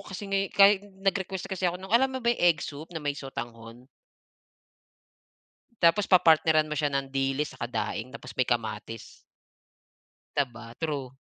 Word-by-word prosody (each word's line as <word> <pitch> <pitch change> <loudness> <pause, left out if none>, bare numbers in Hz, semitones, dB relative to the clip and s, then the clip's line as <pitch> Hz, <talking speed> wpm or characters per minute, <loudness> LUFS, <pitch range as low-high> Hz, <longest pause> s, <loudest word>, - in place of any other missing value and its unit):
kasi 190 +2 -6
ngay 195 0 0
kahi 200 0 +6 0.2
nag-request 190 -1 -1
kasi 185 -1 0
ako 175 - -3
ng 190 +2 -10
alam 255 +3 +5
mo 255 - -7
ba 235 - +4
yung - - -6
egg 160 -3 +1
soup 150 +3 -8
na 175 - -9
may 145 -2 -1
sotanghon? 120 -3 -8 1.9
Tapos 185 +4 +4
papartneran 160 -3 +5
mo 150 - -8
siya 150 0 +1
ng 140 -1 -3
dilis 135 +2 -1
tsaka 120 -2 -5
daing 110 0 -3
tapos 130 -1 -10
may 130 - +1
kamatis. 115 -1 -4 1.2
Di 145 - +4
ba? 115 0 -11
True. 145 -3 -3
150 Hz, 160 wpm, -27 LUFS, 130-185 Hz, 1.9 s, kahi